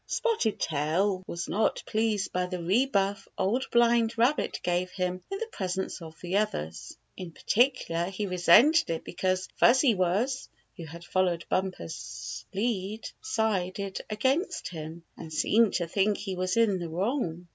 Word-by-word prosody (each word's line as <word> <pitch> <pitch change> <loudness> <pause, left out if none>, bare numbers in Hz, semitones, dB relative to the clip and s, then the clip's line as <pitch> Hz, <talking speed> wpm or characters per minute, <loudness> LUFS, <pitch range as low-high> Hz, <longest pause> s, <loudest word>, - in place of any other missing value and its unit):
Spotted 450 - 0
Tail 175 +6 0
was 170 0 -4
not 215 +4 0
pleased 215 -3 0
by 180 0 0
the 180 0 -4
rebuff 200 0 +1
the - - -5
Old 235 +8 0
Blind 235 -1 +3
Rabbit 245 +6 +1
gave 180 +1 0
him 185 -1 -3
in 390 - -3
the 460 - -3
presence 190 -1 -3
of 160 -1 -10
the 180 +2 -1
others. 80 - -3 0.2
In 180 -2 -7
particular 215 - +1
he 195 +3 -3
resented 195 - +5
it 165 -1 -2
be - - -9
cause 185 +1 0
Fuzzy 255 +1 +5
Wuzz, 205 +8 0 0.3
who 170 - -8
had 170 +2 -10
followed 180 -3 0
Bumper's 185 - -4
lead, 210 0 -2
sided 200 - -1
against 270 - 0
him, 160 0 -8
and 160 - -9
seemed 220 +7 +3
to 175 - 0
think 200 +4 +1
he 195 -2 -4
was 185 +3 -1
in 215 -5 +3
the 170 -1 -5
wrong. 180 - -2
190 Hz, 155 wpm, -28 LUFS, 175-225 Hz, 0.3 s, resented